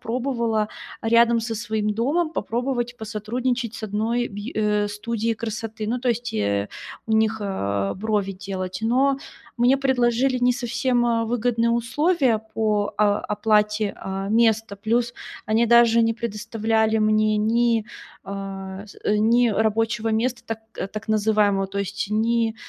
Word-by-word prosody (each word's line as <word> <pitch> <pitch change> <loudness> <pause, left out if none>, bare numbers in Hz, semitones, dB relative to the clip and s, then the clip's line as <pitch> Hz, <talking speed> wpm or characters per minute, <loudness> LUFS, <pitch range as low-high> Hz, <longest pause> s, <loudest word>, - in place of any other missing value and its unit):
пробовала, 235 -3 -1 0.3
а, 225 - -2
рядом 235 0 +5
со 225 0 -3
своим 215 0 -2
домом 300 +9 0
попробовать 240 0 -2
посотрудничать 230 +2 -3
с - - -8
одной 225 +4 -1
бьй 205 +4 -7
э, 210 -1 +1
студией 225 +2 -2
красоты. 220 -1 -5
Ну, 245 +3 0
то 250 - -1
есть, 240 +1 -3
э, 100 -1 0 0.4
у 220 - -2
них, 220 0 +2
э, 100 - -2
брови 205 -1 -1
делать. 185 -1 -5
Но 265 +4 +2 0.4
мне 245 +3 +4
предложили 255 -1 +2
не 250 0 +3
совсем, 240 0 0
э, 230 -1 +1
выгодные, 235 0 +1
а, - - +2
условия 250 +2 +2 0.2
по, 210 -2 0
а, 205 -1 +3
оплате, 210 0 +1
э, 195 0 -4
места. 225 -2 +2
Плюс 235 +4 0 0.3
они 220 +2 +3
даже 235 0 +6
не 225 0 +2
предоставляли 220 0 0
мне 215 0 +3
ни, 230 +1 +2 0.4
а, 195 0 -6
с 200 - -14
ни 225 +3 +3
рабочего 220 +1 0
места, 235 +3 0
так, 225 -1 -3 0.2
э, - - -3
так 215 +2 -8
называемого, 210 -2 +2
то 195 +1 -5
есть 200 0 -3
ни 225 +1 +1
225 Hz, 150 wpm, -23 LUFS, 210-235 Hz, 0.4 s, даже